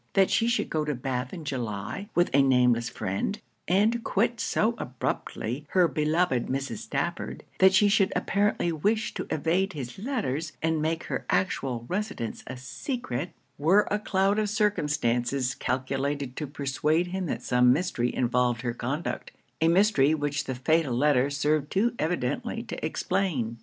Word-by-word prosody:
That 195 -1 +4
she 230 - +3
should 235 - 0
go 155 -1 +1
to 150 -1 -2
Bath 125 0 -3
in 165 -4 -7
July, 125 - -4
with 175 0 +3
a 140 - +6
nameless 125 -3 +3
friend, 100 - -3 0.3
and 215 +6 +2
quit 230 +3 +1
so 225 0 +1
abruptly 125 +2 -3
her 180 -2 +5
beloved 155 -2 +1
Mrs. 135 -3 -2
Stafford - - -3 0.2
that 190 0 +6
she 205 +2 +6
should 200 -2 +3
apparently 200 -3 +1
wish 210 +8 0
to - - -5
evade 180 +5 0
his 130 0 -6
letters, 165 - -2
and 160 +1 0
make 160 +1 -1
her - - -3
actual 130 -10 0
residence 190 - -3
a 130 - -6
secret 150 - -4 0.3
were 185 +8 +4
a 210 - +1
cloud 200 0 +1
of 210 -1 0
circumstances 140 - +1
calculated 135 +1 -2
to 150 - -4
persuade 145 +4 0
him 185 0 -3
that - - -3
some 125 0 +4
mystery 130 -5 0
involved 120 -1 +1
her 120 -2 -1
conduct; 135 +7 -3 0.3
a 160 - +4
mystery 170 -5 +4
which 145 -1 -2
the 130 - -3
fatal 145 0 +1
letter 140 0 +3
served 145 +1 0
too 220 +5 +1
evidently 180 - -1
to 230 - -7
explain. 155 - -1
150 Hz, 155 wpm, -27 LUFS, 130-190 Hz, 0.3 s, a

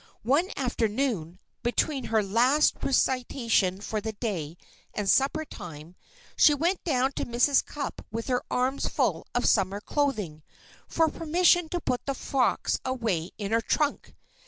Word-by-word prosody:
One 290 - +2
afternoon, 225 - -1 0.2
between 260 +2 0
her 220 -1 +1
last 245 +9 +3
recitation 240 -8 +1
for 215 0 -3
the 220 +1 -4
day 175 -8 -4 0.4
and 210 -2 -2
suppertime, 185 - -1 0.4
she 295 - +6
went 345 +6 0
down 265 -4 +1
to - - -4
Mrs. 245 +4 +3
Cupp 290 -1 -6
with 230 +1 -4
her 250 -1 0
arms 260 +2 0
full - - -1
of - - +1
summer 195 -1 +2
clothing, 210 - -2 0.5
for 325 -1 +2
permission 335 +2 +2
to 350 - -2
put 250 -6 -3
the 275 - -1
frocks 260 -1 0
away 225 -10 -1
in 205 -1 -4
her 230 +1 +3
trunk. 295 +5 -1
245 Hz, 140 wpm, -27 LUFS, 205-280 Hz, 0.5 s, she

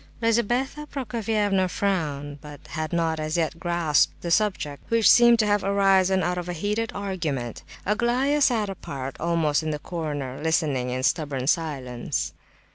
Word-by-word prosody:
Lizabetha 240 +6 0
Prokofievna 215 -7 0
frowned, 145 -8 -2
but 145 -1 -10
had 155 -1 -4
not 165 -2 0
as 155 +2 -2
yet 165 0 -1
grasped 170 -5 +1
the 170 - -3
subject, 170 -8 0
which 230 -3 +4
seemed 235 -1 +7
to 220 - +2
have 205 -1 +2
arisen 195 -1 +3
out 180 0 0
of 175 0 -6
a - - -2
heated 210 +6 -2
argument. 160 - -3 0.2
Aglaya 245 +8 +1
sat 230 -6 +3
apart, 135 -8 -6
almost 165 -3 +1
in 155 - -3
the 150 - -1
corner, 145 -5 -4
listening 150 -6 0
in 130 +1 -3
stubborn 145 -3 0
silence. 135 -6 -1
175 Hz, 150 wpm, -25 LUFS, 150-210 Hz, 0.2 s, seemed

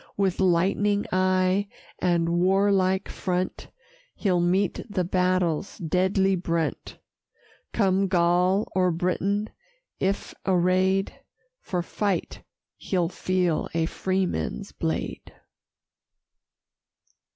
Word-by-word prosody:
With 195 -2 0
lightning 195 +3 +2
eye, 185 +1 +2 0.3
and 170 -2 +1
warlike 190 0 +2
front, 185 -1 -3 0.5
He'll 185 -4 +1
meet 180 +2 +1
the 190 -3 0
battle's 180 -1 0
deadly 190 +2 +1
brunt: 170 -2 -2 0.7
Come 195 -2 +2
Gaul 180 +2 +2
or 185 -1 +3
Briton; 185 +5 -1 0.5
if 195 +1 -1
array'd 185 +1 +2 0.5
For 180 -2 -2
fight 195 0 -2 0.4
he'll 175 -3 -1
feel 180 -3 0
a 165 -1 +2
freeman's 185 - -2
blade. 80 0 -4
185 Hz, 85 wpm, -25 LUFS, 175-195 Hz, 0.7 s, or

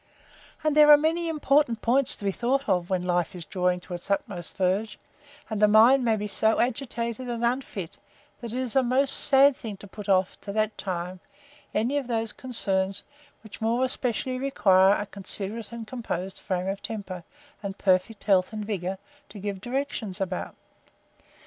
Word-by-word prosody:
And 305 -1 +1
there 300 0 +7
are 295 - +10
many 330 +3 0
important 285 -6 +1
points 255 +2 +3
to 205 - -8
be 195 - +2
thought 265 +6 -1
of, 180 -1 +1
when 185 -2 0
life 175 +1 0
is 175 -2 -7
drawing 180 +2 0
to 180 - -9
its 175 +2 -4
utmost 195 -3 -2
verge; 195 +4 0 0.5
and 215 -2 -3
the 210 - +7
mind 230 +5 +6
may 225 -2 +2
be 210 -1 -4
so 220 +2 +2
agitated 240 -1 -2
and 235 0 -1
unfit, 235 -8 -3 0.4
that 235 -3 -6
it 245 - -4
is 255 -2 -2
a 265 - +6
most 260 +2 +2
sad 275 0 +5
thing 215 -5 -7
to 205 - -12
put 205 +1 -9
off, 185 -1 +1
to 200 - -6
that 215 0 0
time, 180 -1 -4 0.5
any 245 +7 0
of 270 - -7
those 225 -2 -2
concerns, 195 -6 0 0.4
which 220 0 -12
more 235 +3 +1
especially 255 0 -2
require 195 -8 +4
a 205 - -3
considerate 200 +3 -3
and 235 -1 -7
composed 195 -6 -5
frame 185 -2 -2
of 195 +1 -3
temper, 195 -5 -6 0.4
and 200 -1 -5
perfect 195 +3 +1
health 190 -2 +3
and 215 -1 -5
vigour, 190 -3 -3 0.3
to 205 - -11
give 200 -1 -5
directions 240 -5 -3
about. 185 -2 -3
215 Hz, 180 wpm, -26 LUFS, 190-250 Hz, 0.5 s, are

